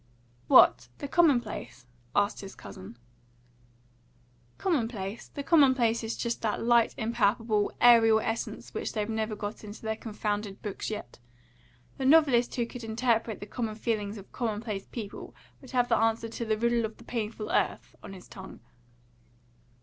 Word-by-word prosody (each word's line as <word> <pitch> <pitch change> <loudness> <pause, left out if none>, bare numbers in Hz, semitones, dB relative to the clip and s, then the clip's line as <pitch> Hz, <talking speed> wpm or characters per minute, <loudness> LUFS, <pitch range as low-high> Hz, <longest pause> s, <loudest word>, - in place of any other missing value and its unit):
"What? 120 - +6
the - - -5
commonplace?" 245 - +1 0.3
asked 205 +1 +1
his 195 -1 -9
cousin. 100 +4 -11 1.6
"Commonplace? 230 - -2
The 285 - -7
commonplace 260 -7 +4
is 225 +1 -3
just 235 -1 -2
that 220 -1 -1
light, 235 -1 +3
impalpable, 220 -1 +1
aerial 225 -2 +7
essence 225 +1 -4
which - - -3
they've 210 -2 -1
never 220 -1 -2
got 205 +1 -6
into 210 +1 -10
their 220 0 -1
confounded 210 -2 -4
books 205 -2 -4
yet. 210 - -7 0.8
The 265 - -1
novelist 275 -6 +5
who 240 - 0
could 240 +1 -9
interpret 225 -1 0
the - - -5
common 220 0 -4
feelings 215 -2 -2
of 195 - -12
commonplace 215 -4 -3
people 215 -4 -8 0.3
would 265 - -13
have 245 -2 +2
the 230 - +3
answer 225 0 +1
to 230 +1 -5
'the 215 -1 0
riddle 235 +1 +1
of 220 0 -4
the - - -15
painful 225 -2 -4
earth' - - -1
on - - -9
his 185 -2 -12
tongue." 190 0 -11
225 Hz, 150 wpm, -29 LUFS, 210-235 Hz, 1.6 s, aerial